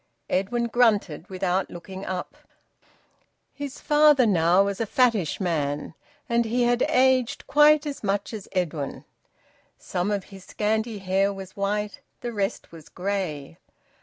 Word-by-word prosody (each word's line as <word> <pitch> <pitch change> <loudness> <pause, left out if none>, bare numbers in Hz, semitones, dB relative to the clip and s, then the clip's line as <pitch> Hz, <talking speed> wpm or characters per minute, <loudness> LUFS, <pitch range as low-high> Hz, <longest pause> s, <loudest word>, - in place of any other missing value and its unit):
Edwin 235 +6 0
grunted 215 -8 +1
without 185 0 -1
looking 190 +2 -8
up. 185 -1 -4 1.2
His 285 -2 -7
father 295 -3 +5
was 210 - +3
now 175 +3 +4
a 200 - 0
fattish 225 - +2
man, 150 -6 -2 0.3
and 235 -1 +2
he 240 +2 0
had 240 0 +2
aged 260 0 +2
quite 300 0 +5
as 285 -5 -5
much 200 +2 -1
as 210 -3 -7
Edwin. 165 -7 -3 0.7
Some 180 +3 -2
of 205 -2 -1
his 195 -1 -13
scanty 220 +2 -1
hair 195 +1 +1
was 195 -2 -9
white; 205 +1 -2 0.2
the 240 -1 -4
rest 200 0 -3
was 165 -2 -13
grey. 180 -5 -4
200 Hz, 135 wpm, -25 LUFS, 185-240 Hz, 1.2 s, father